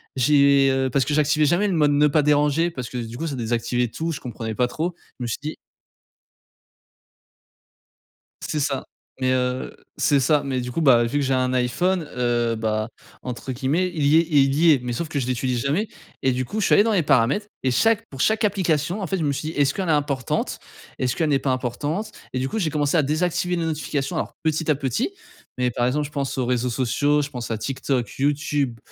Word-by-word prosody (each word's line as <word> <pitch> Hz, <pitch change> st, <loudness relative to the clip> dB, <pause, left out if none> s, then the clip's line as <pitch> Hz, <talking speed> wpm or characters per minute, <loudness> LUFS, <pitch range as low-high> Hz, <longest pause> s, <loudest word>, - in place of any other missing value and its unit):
j'ai, 140 Hz, +1 st, +4 dB
heu, 130 Hz, 0 st, +1 dB
parce 135 Hz, 0 st, +2 dB
que 145 Hz, +2 st, -1 dB
j'activais 150 Hz, 0 st, +3 dB
jamais 180 Hz, +7 st, +2 dB
le 190 Hz, -, 0 dB
mode 150 Hz, -3 st, +3 dB
«ne 145 Hz, +1 st, +4 dB
pas 150 Hz, +1 st, +3 dB
déranger» 150 Hz, +3 st, +2 dB
parce 125 Hz, -6 st, -6 dB
que 125 Hz, -, -6 dB
du 115 Hz, 0 st, -6 dB
coup 165 Hz, -, -3 dB
ça 145 Hz, -, -3 dB
désactivait 120 Hz, +1 st, -1 dB
tout, 165 Hz, +8 st, -4 dB
je 155 Hz, -, -5 dB
comprenais 115 Hz, -2 st, -5 dB
pas 125 Hz, +1 st, +2 dB
trop, 165 Hz, +7 st, -3 dB, 0.3 s
je 125 Hz, -, -4 dB
me -, -, -2 dB
suis 115 Hz, -, -2 dB
dit 155 Hz, +2 st, -5 dB, 2.9 s
C'est 150 Hz, -, -2 dB
ça. 140 Hz, -2 st, -1 dB, 0.3 s
Mais 130 Hz, 0 st, +1 dB
heu 125 Hz, 0 st, -1 dB, 0.2 s
c'est 145 Hz, -2 st, +3 dB
ça, 145 Hz, +3 st, +2 dB
mais 130 Hz, -2 st, -2 dB
du 125 Hz, 0 st, -5 dB
coup, 165 Hz, -, -2 dB
bah, 125 Hz, -6 st, +5 dB
vu 130 Hz, +5 st, -1 dB
que 145 Hz, -, +1 dB
j'ai 135 Hz, -, +1 dB
un 130 Hz, 0 st, +1 dB
iPhone, 160 Hz, +8 st, 0 dB
heu, 120 Hz, -1 st, +1 dB
bah, 110 Hz, 0 st, -1 dB, 0.4 s
entre 125 Hz, +1 st, -5 dB
guillemets, 150 Hz, +9 st, 0 dB
«il 150 Hz, -, 0 dB
y 150 Hz, +3 st, +5 dB
est 165 Hz, -, +3 dB
il 140 Hz, -3 st, +4 dB
y 160 Hz, +3 st, +5 dB
est» 135 Hz, -, +1 dB
mais 120 Hz, -1 st, -3 dB
sauf 160 Hz, +8 st, -3 dB
que 145 Hz, -, -1 dB
je 130 Hz, -, -2 dB
l'utilise 125 Hz, 0 st, -1 dB
jamais 150 Hz, -, 0 dB, 0.3 s
et 130 Hz, -, +2 dB
du 130 Hz, 0 st, -1 dB
coup, 215 Hz, -, -4 dB
je -, -, +1 dB
suis -, -, +3 dB
allé 205 Hz, -, +6 dB
dans 225 Hz, -, +1 dB
les 195 Hz, -5 st, +3 dB
paramètres 140 Hz, -, +2 dB, 0.2 s
et 130 Hz, -, +2 dB
chaque 225 Hz, -, +2 dB
pour 135 Hz, -1 st, -5 dB
chaque 220 Hz, +6 st, +2 dB
application, 180 Hz, -2 st, 0 dB
en 190 Hz, -, -3 dB
fait, 190 Hz, -, -1 dB
je 165 Hz, -, -2 dB
me 145 Hz, -, +1 dB
suis 155 Hz, +3 st, -3 dB
dit: -, -, -6 dB
«Est-ce 140 Hz, 0 st, +3 dB
qu'elle 190 Hz, -3 st, -3 dB
est -, -, +4 dB
importante? 145 Hz, -4 st, -1 dB, 0.4 s
Est-ce 125 Hz, -1 st, 0 dB
qu'elle 160 Hz, -3 st, 0 dB
n'est 135 Hz, -, +3 dB
pas 135 Hz, -, -2 dB
importante?» 145 Hz, -, -2 dB, 0.2 s
Et 130 Hz, -, -1 dB
du 130 Hz, -, -1 dB
coup, 220 Hz, -, -3 dB
j'ai 165 Hz, -, 0 dB
commencé 145 Hz, +1 st, 0 dB
à 160 Hz, -, +5 dB
désactiver 175 Hz, +4 st, 0 dB
les 170 Hz, -1 st, -1 dB
notifications, 150 Hz, -3 st, -2 dB
alors -, -, -3 dB
petit 160 Hz, 0 st, 0 dB
à 150 Hz, -, +4 dB
petit, 140 Hz, -, -1 dB, 0.5 s
mais 125 Hz, -1 st, +1 dB
par 120 Hz, +1 st, 0 dB
exemple, 150 Hz, +3 st, 0 dB
je 145 Hz, -, -9 dB
pense 140 Hz, -2 st, -3 dB
aux 125 Hz, -, 0 dB
réseaux 125 Hz, 0 st, 0 dB
sociaux, 140 Hz, +5 st, +1 dB
je 145 Hz, -, -6 dB
pense 125 Hz, -4 st, -6 dB
à 115 Hz, -, -1 dB
TikTok, 130 Hz, 0 st, -2 dB
YouTube, 145 Hz, -3 st, 0 dB
140 Hz, 230 wpm, -23 LUFS, 125-155 Hz, 2.9 s, allé